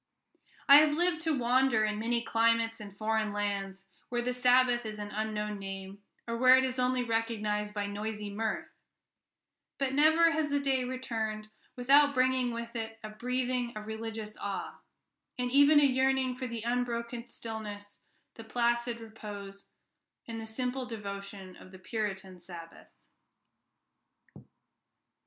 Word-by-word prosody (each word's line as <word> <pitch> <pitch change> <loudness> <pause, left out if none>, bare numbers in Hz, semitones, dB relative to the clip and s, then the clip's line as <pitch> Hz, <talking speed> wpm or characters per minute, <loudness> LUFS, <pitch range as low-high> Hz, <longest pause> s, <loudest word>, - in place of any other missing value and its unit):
I 280 - +11
have 300 0 +5
lived 350 -2 +2
to 315 -3 +1
wander 250 -2 +3
in 210 0 -2
many 235 +1 0
climates 230 0 +2
and 200 -2 -10
foreign 220 0 0
lands, 200 -2 -3 0.2
where 240 -1 -1
the 250 +1 -1
Sabbath 250 -1 +4
is 215 -1 -6
an 205 0 -5
unknown 210 -1 -3
name, 195 0 -7 0.3
or 230 - -2
where 255 +1 +7
it 260 - +3
is 255 0 -2
only 250 0 +1
recognized 215 -2 -1
by 205 -1 -1
noisy 210 0 -4
mirth; 220 +2 -3 1.1
but 270 -1 -1
never 315 +3 +5
has 315 -2 0
the 285 0 +1
day 270 -2 +1
returned 225 -4 -3 0.3
without 280 +3 +5
bringing 255 -1 +2
with 235 0 -6
it 225 -1 -4
a 215 - -5
breathing 250 +1 -2
of 210 - -7
religious 220 -1 -5
awe, 200 -1 -5 0.6
and 250 -1 -1
even 285 +2 +7
a - - +4
yearning 265 -1 +2
for 255 0 -4
the 230 -2 -5
unbroken 235 0 -2
stillness, 210 -3 -7 0.3
the 225 - -10
placid 235 +1 0
repose, 205 -3 -9 0.6
and 225 -1 -5
the 220 - -7
simple 250 +3 -3
devotion 200 -4 -7
of 185 - -14
the 190 - -11
Puritan 190 -2 -4
Sabbath. 170 -2 -11
230 Hz, 145 wpm, -30 LUFS, 210-255 Hz, 1.1 s, I